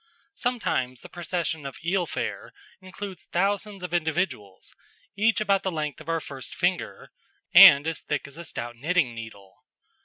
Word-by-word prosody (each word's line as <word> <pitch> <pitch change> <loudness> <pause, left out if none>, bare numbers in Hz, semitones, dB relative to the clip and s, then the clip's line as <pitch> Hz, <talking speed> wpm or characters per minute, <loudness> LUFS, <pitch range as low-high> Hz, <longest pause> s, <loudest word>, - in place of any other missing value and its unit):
Sometimes 130 - -2
the - - -12
procession 170 -3 -3
or 140 -1 -6
eel 180 0 +1
fare - - -4 0.3
includes 185 -1 -8
thousands 200 +1 -1
of 180 -1 -5
individuals, 160 - -2 0.4
each 220 +3 +2
about 200 -2 +2
the 190 - -2
length 155 -2 -4
of 155 - -10
our 165 0 +1
first 135 -6 -8
finger, - - -2 0.4
and 140 +1 +10
as 165 0 -3
thick 150 -2 -3
as 140 - -12
a 170 - -8
stout 120 -6 -6
knitting 145 0 +1
needle. 110 -4 -11
165 Hz, 155 wpm, -26 LUFS, 140-190 Hz, 0.4 s, and